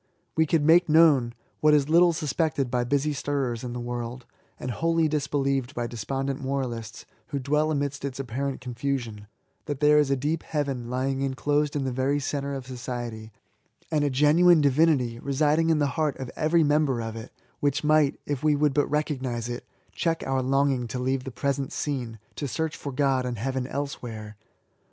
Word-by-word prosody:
We 160 0 +3
could 155 -1 +2
make 170 +2 +5
known 150 -7 +5
— - - -39
^what 155 0 +6
is 145 -2 +3
little 170 +2 +5
suspected 150 -4 -1
by 125 -1 +1
busy 145 +3 +1
stirrers 135 -4 -2
in 120 -1 -4
the 125 - -4
world, 120 0 -5 0.3
and 125 - -3
wholly 165 +6 +1
disbelieved 140 -3 -1
by 120 - -1
despondent 135 +4 -3
moraUsts 120 -4 -4 0.2
who 140 - -3
dwell 150 +3 +1
amidst 140 -3 -2
its 140 -1 -4
apparent 135 +2 -3
confusion 120 -4 -4 0.2
— - - -45
that 145 -2 -3
there 150 0 +5
is 145 -2 +2
a 135 - +3
deep 150 +5 -1
heaven 135 -6 -3
lying 130 +2 -1
inclosed 145 +2 0
in 145 - 0
the 130 - -1
very 135 +3 0
centre 140 0 -3
of 135 -2 -6
society, 120 -3 -6 0.6
and 150 -2 +2
a 145 - +2
genuine 155 +6 +5
divinity 140 -4 +2
residing 150 +5 +2
in 160 - +4
the 145 - +2 0.2
heart 150 -3 0
of 130 -2 -6
every 160 +2 +3
member 145 -4 +2
of 115 -1 -4
it, 115 +1 -8 0.3
which 145 0 0
might, 150 -2 +3
if 145 -1 -3
we 150 -1 +4
would 145 -1 +2
but 145 0 +2
recognise 130 -6 -2
it, 120 0 -6 0.2
check 165 -1 -1
our 135 0 0
longing 135 -1 +1
to 125 - -5
leave 130 +1 -1
the 135 - -5
present 140 +2 -2
scene, 125 -6 -3 0.2
to 145 - -3
search 160 +6 -2
for 140 - -6
God 135 -1 +1
and 125 -2 -3
Heaven 130 +3 -2
elsewhere. 120 -7 -5
135 Hz, 190 wpm, -26 LUFS, 125-150 Hz, 0.6 s, ^what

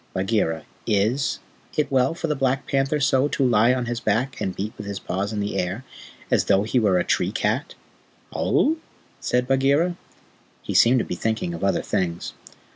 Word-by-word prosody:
Bagheera, 95 -4 0 0.2
IS 110 +7 +1 0.4
it 150 - +1
well 130 +3 +2
for 165 - -4
the 150 -2 0
Black 135 0 0
Panther 135 +2 +1
so 135 0 +3
to 140 -2 0
lie 115 -1 +4
on 125 -1 0
his 120 0 -3
back 120 +5 -1
and 95 - -2
beat 105 +3 -4
with - - -8
his 100 -1 -4
paws 95 +3 -3
in 105 -1 -2
the 100 -1 -3
air, 95 +6 -2 0.5
as - - +3
though 100 0 +3
he 115 +4 +1
were 100 -5 +3
the 90 - +2
tree 90 - 0
cat?" 115 - -1 0.6
"Aowh?" 315 +3 +2 0.4
said 125 0 0
Bagheera. 140 +6 +2 0.7
He - - -4
seemed 120 +2 +6
to 120 - 0
be - - -4
thinking 110 -2 -2
of 85 - -6
other 100 - +1
things. 90 -4 -2
115 Hz, 190 wpm, -23 LUFS, 100-135 Hz, 0.7 s, seemed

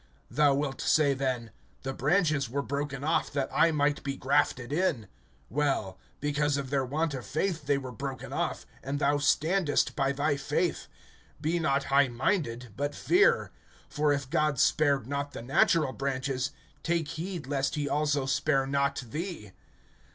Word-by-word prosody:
(19)Thou 145 0 +4
wilt 140 -2 -2
say 145 -3 +3
then: 130 -4 -2 0.3
The 135 - -3
branches 150 - +1
were 140 +3 -2
broken 140 -1 -3
off, 160 +2 +1
that 140 -2 -1
I 165 - +5
might 150 -2 +1
be 140 -1 -4
grafted 135 -2 +1
in. 150 - 0 0.5
(20)Well; 135 -10 0 0.2
because 145 0 0
of 135 -2 -4
their 140 -2 +2
want 150 +4 -1
of 130 -2 -5
faith 160 0 -2
they 140 -1 +3
were 130 -2 -6
broken 135 +2 -6
off, - - -2 0.2
and 140 +2 -2
thou 145 0 +2
standest 155 +3 +2
by 135 -1 +1
thy 145 +1 0
faith. 150 +5 -1 0.5
Be 160 +3 0
not 140 -3 +1
high 140 0 +6
minded, 120 - -1
but 145 +2 -2
fear; 390 +3 +3 0.4
(21)for 150 -1 +2
if 140 -2 -5
God 150 -1 +1
spared 140 -3 +3
not 140 +2 -3
the - - -7
natural 135 +2 +3
branches, 135 0 -2 0.3
take 165 -3 0
heed 170 -1 -5
lest 140 +1 -1
he 145 -1 -1
also 145 -1 +1
spare 135 0 +1
not 140 0 0
thee. 155 - -5
140 Hz, 160 wpm, -29 LUFS, 135-150 Hz, 0.5 s, high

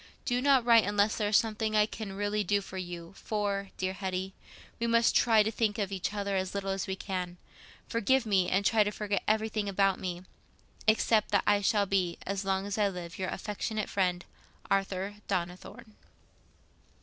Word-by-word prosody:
Do 245 0 0
not 270 -3 +4
write 230 -2 +6
unless 205 +1 +2
there 210 - 0
is 210 - +5
something 220 -1 0
I 210 0 +5
can 215 -2 -7
really 205 +1 -1
do 205 +2 +2
for 190 -1 -7
you; 175 0 -7
for, 200 -2 -2
dear 185 0 -1
Hetty, 190 0 -3 0.5
we 235 - 0
must 230 0 +3
try 225 -3 +5
to 220 - -1
think 215 -2 0
of 200 -2 -2
each 195 0 -2
other 200 -1 -2
as 190 0 -2
little 195 -1 -2
as 195 -1 -2
we 190 - -2
can. 180 -2 -4 0.5
Forgive 245 +3 +2
me, 190 -4 +2
and 195 +2 +1
try 220 0 +4
to 205 - -1
forget 210 -1 -2
everything 215 -1 0
about 195 -1 +2
me, 180 -1 -4 0.6
except 220 0 +3
that 200 - +2
I 205 0 +3
shall 205 0 +2
be, 185 -3 0
as 195 +1 -2
long 195 0 0
as 205 +1 -3
I 205 - +4
live, 180 -2 -7
your 185 - -2
affectionate 215 0 -3
friend, 180 -3 0 0.5
"ARTHUR 195 +1 -1
DONNITHORNE." 180 +3 -4
200 Hz, 185 wpm, -30 LUFS, 190-215 Hz, 0.6 s, write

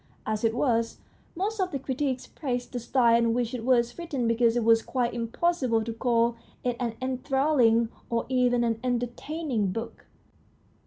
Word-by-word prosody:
As 215 0 -2
it 225 0 +2
was, 230 -3 +1 0.4
most 405 +5 -2
of 370 -1 +1
the 285 - -3
critics 265 -1 -2
praised 250 -5 -4
the 245 - -2
style 235 -1 +3
in 230 -1 +2
which 245 -1 -1
it 245 -3 -4
was 240 +1 +2
written 280 -8 -2
because 230 0 +3
it 240 - +1
was 225 0 +5
quite 245 -1 -1
impossible 240 0 0
to 230 +1 -4
call 235 0 +1 0.3
it 245 -1 0
an 235 -3 -2
enthralling 255 -3 +2 0.2
or 235 -1 0
even 250 -2 +2
an 225 -1 0
entertaining 245 - -2
book. 225 +4 -6
245 Hz, 165 wpm, -27 LUFS, 230-260 Hz, 0.4 s, was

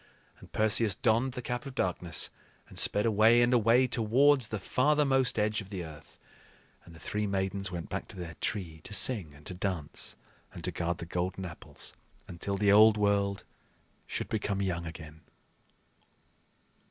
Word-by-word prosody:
And - - -15
Perseus 110 -1 +2
donned 120 +2 +1
the 125 -1 -6
Cap 125 +3 -4
of 135 - -9
Darkness, 90 - -1 0.4
and - - -5
sped 105 - +3
away 110 +2 +5
and 120 +1 +2
away 120 +2 +4
towards 125 +3 +3
the 110 - -3
farthermost 135 +2 +2
edge 105 0 0
of 100 - -12
the 95 -4 -5
earth; 75 -1 -13 0.7
and 85 - -15
the - - -14
three 105 +3 -3
Maidens 95 0 -1
went 85 -2 -5
back - - -4
to - - -10
their 85 -2 -6
tree 85 -6 -3
to 105 - 0
sing 95 - +2
and 75 - -17
to - - -7
dance 90 -5 -4 0.4
and - - -9
to - - +1
guard 85 0 -2
the - - -7
golden 90 +2 -3
apples 85 -1 -10 0.3
until 100 +3 -3
the 100 0 +3
old 110 +1 +7
world 100 -1 +1 0.6
should - - -4
become 105 -2 -2
young 85 -4 -2
again. 80 -1 -10
100 Hz, 165 wpm, -30 LUFS, 90-115 Hz, 0.7 s, old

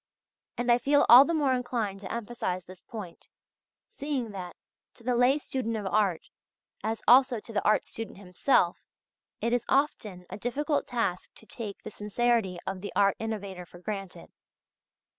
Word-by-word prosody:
And 245 0 +1
I 240 - +5
feel 285 +3 +3
all 250 +4 +11
the 335 - -1
more 285 -4 +2
inclined 235 -6 -2
to 195 - -7
emphasize 215 -6 -3
this 185 0 -13
point, 205 -7 -9 0.6
seeing 275 -6 -4
that, 185 -3 -7 0.4
to 235 - -17
the 250 +1 +1
lay 250 +4 +4
student 255 -6 -3
of 210 - -5
art, 195 -3 +1 0.6
as 220 0 -2
also 255 -1 +6
to 225 - -12
the 200 - 0
art 215 - +3
student 225 -3 -7
himself, 185 0 +1 0.5
it 235 - 0
is 245 -1 +1
often 215 -10 0
a - - -7
difficult 290 +6 -1
task 230 -7 -2
to - - -16
take 215 -3 -7
the 215 - -7
sincerity 210 -2 0
of 190 -1 -4
the 205 - -5
art 200 -1 +4
innovator 200 -5 -4
for 175 - -14
granted. 195 0 -6
225 Hz, 165 wpm, -28 LUFS, 195-245 Hz, 0.6 s, all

